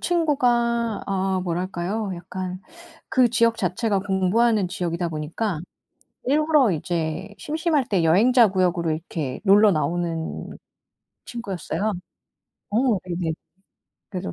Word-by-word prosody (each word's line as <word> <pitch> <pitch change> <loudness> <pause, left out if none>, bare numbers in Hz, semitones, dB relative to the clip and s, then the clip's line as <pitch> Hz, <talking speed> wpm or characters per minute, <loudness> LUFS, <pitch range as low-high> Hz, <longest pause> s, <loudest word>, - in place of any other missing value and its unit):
친구가 240 - +1
어 190 -1 0
뭐랄까요? 185 +3 -2
약간 185 +1 -6 0.5
그 255 -2 +4
지역 230 0 +3
자체가 200 +1 0
공부하는 200 +2 +2
지역이다 175 -2 -2
보니까 160 +4 -3 0.6
일부러 295 -3 +3
이제 170 +4 -3
심심할 310 -3 0
때 190 -5 +1
여행자 220 +8 +5
구역으로 180 -3 +1
이렇게 155 -4 -4
놀러 205 +1 +6
나오는 165 0 -2 0.8
친구였어요. 210 -3 -3 0.8
어 210 - +1 0.3
네네. 175 -2 -2 0.8
그래서 185 0 -4
190 Hz, 260 characters per minute, -23 LUFS, 175-230 Hz, 0.8 s, 놀러